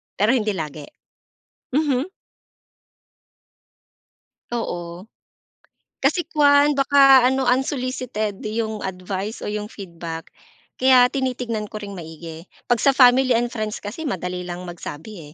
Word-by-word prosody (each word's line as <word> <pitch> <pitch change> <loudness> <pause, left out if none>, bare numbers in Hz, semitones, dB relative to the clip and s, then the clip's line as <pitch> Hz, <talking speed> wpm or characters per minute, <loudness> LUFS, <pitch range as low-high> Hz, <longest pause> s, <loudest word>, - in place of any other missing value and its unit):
pero 210 +5 +3
hindi 215 -5 +1
lagi. 150 -3 -6 0.9
Mhm. 290 -1 +1 2.4
Oo, 175 -6 -5 1.0
kasi 350 - +2
kuwan 290 -1 +5
baka 275 -2 +6
ano 265 0 0
unsolicited 250 -5 -1
yung 220 0 -3
advice 190 +3 -5
o - - -4
yung 210 0 -4
feedback 170 -5 -8 0.4
kaya 255 -1 +6
tinitignan 250 -5 -2
ko 215 - -7
ring 200 -1 -7
maigi. 165 0 -9 0.2
'Pag 240 - +4
sa 275 - +4
family 255 0 +6
and 240 0 0
friends 215 -2 -3
kasi 225 +11 -6
madali 180 -2 -3
lang 175 0 -6
magsabi, 170 -1 -9
220 Hz, 115 wpm, -22 LUFS, 180-260 Hz, 2.4 s, baka